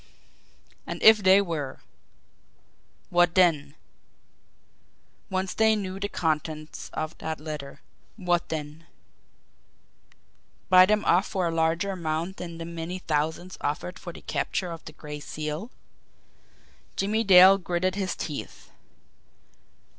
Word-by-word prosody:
And -, -, -5 dB
if 220 Hz, -1 st, +8 dB
they 195 Hz, 0 st, +5 dB
were! 150 Hz, -7 st, -4 dB, 1.3 s
What 175 Hz, -1 st, +3 dB
then? 155 Hz, -6 st, +3 dB, 1.5 s
Once 190 Hz, -1 st, -2 dB
they 220 Hz, 0 st, +3 dB
knew 195 Hz, -2 st, -4 dB
the 205 Hz, +1 st, -3 dB
contents 155 Hz, -2 st, -3 dB
of 155 Hz, +1 st, -4 dB
that 160 Hz, 0 st, -4 dB
letter 150 Hz, -2 st, -7 dB, 0.3 s
what 175 Hz, -4 st, 0 dB
then? 155 Hz, +1 st, -6 dB, 1.8 s
Buy 185 Hz, 0 st, +8 dB
them 210 Hz, +1 st, +1 dB
off 180 Hz, +4 st, +3 dB
for 185 Hz, -2 st, -1 dB
a -, -, -1 dB
larger 165 Hz, +4 st, 0 dB
amount 170 Hz, +1 st, -3 dB
than 170 Hz, -2 st, -7 dB
the 165 Hz, -, -6 dB
many 170 Hz, +2 st, -5 dB
thousands 160 Hz, +2 st, -2 dB
offered 160 Hz, +5 st, -3 dB
for 175 Hz, -, -7 dB
the -, -, -12 dB
capture 180 Hz, -2 st, -2 dB
of 165 Hz, -1 st, -8 dB
the 155 Hz, -, -9 dB
Gray 150 Hz, -1 st, -8 dB
Seal? 155 Hz, +8 st, -5 dB, 1.3 s
Jimmie 215 Hz, +3 st, 0 dB
Dale 190 Hz, -1 st, +8 dB
gritted 180 Hz, 0 st, -1 dB
his 190 Hz, -2 st, -2 dB
teeth. 150 Hz, -3 st, -7 dB
175 Hz, 120 wpm, -26 LUFS, 155-190 Hz, 1.8 s, if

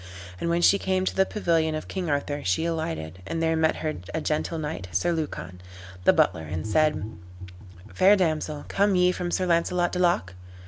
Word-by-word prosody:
And 170 Hz, -, -2 dB
when 170 Hz, +1 st, +1 dB
she 200 Hz, -, +5 dB
came 185 Hz, 0 st, 0 dB
to -, -, -1 dB
the 190 Hz, 0 st, +3 dB
pavilion 165 Hz, -6 st, 0 dB
of 155 Hz, -, -5 dB
King 185 Hz, -4 st, -3 dB
Arthur, 145 Hz, 0 st, -1 dB
she 90 Hz, -, 0 dB
alighted, 95 Hz, -, -3 dB
and 165 Hz, -, -3 dB
there 165 Hz, 0 st, +1 dB
met 160 Hz, 0 st, +2 dB
her 155 Hz, -, -2 dB, 0.2 s
a -, -, 0 dB
gentle 155 Hz, +2 st, -2 dB
knight, 150 Hz, -12 st, -4 dB
Sir 175 Hz, -, +1 dB
Lucan, 145 Hz, -, -4 dB, 0.4 s
the -, -, +8 dB
butler, 80 Hz, -, +2 dB
and 85 Hz, +4 st, -4 dB
said, 150 Hz, +4 st, +2 dB, 0.9 s
"Fair 195 Hz, +2 st, +6 dB
damsel, 155 Hz, -5 st, -1 dB
come 200 Hz, 0 st, +2 dB
ye 180 Hz, 0 st, +4 dB
from 180 Hz, -1 st, -3 dB
Sir 185 Hz, +1 st, 0 dB
Launcelot 175 Hz, 0 st, +1 dB
du 180 Hz, -, -3 dB
Lac?" 170 Hz, -, +1 dB
165 Hz, 190 wpm, -25 LUFS, 150-180 Hz, 0.9 s, the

